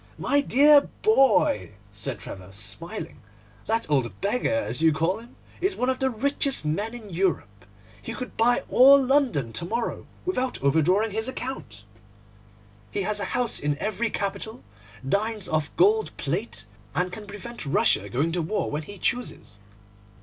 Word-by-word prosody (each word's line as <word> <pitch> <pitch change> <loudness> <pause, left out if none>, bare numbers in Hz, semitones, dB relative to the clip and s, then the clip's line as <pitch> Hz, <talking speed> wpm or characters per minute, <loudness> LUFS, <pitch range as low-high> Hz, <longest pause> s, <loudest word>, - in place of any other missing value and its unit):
'My 285 0 +2
dear 285 +2 +5
boy,' 295 - +3 0.2
said 100 +2 -4
Trevor, 95 -1 -9
smiling, 100 0 -7 0.5
'that 225 +1 0
old 120 -9 0
beggar, 225 +5 0
as 280 - -1
you 160 0 +5
call 165 +7 0
him, 235 +2 -15 0.3
is 380 +2 +1
one 250 +1 +1
of 255 - -4
the 265 - +2
richest 270 - +1
men 205 +10 -2
in 215 -4 -10
Europe. 165 - -1 0.4
He 230 - -6
could 255 - -7
buy 240 +2 +3
all 275 +2 +7
London 255 - +1
to - - -1
morrow 230 +7 -3 0.2
without 260 -9 -1
overdrawing 180 +10 +3
his 220 +3 -1
account. 145 - -6 1.1
He 200 - -2
has 210 +2 0
a - - -1
house 245 -2 0
in 145 0 -1
every 220 +5 -1
capital, 205 +2 -4 0.4
dines 210 +5 0
off 155 -2 0
gold 420 +5 +3
plate, - - -3 0.3
and 180 0 0
can 210 +2 -8
prevent 210 +4 -8
Russia 205 +11 +1
going 145 +7 0
to 175 +1 -1
war 185 +7 -2
when 150 +1 -2
he 200 +6 -10
chooses. 185 - -3
215 Hz, 155 wpm, -25 LUFS, 155-255 Hz, 1.1 s, all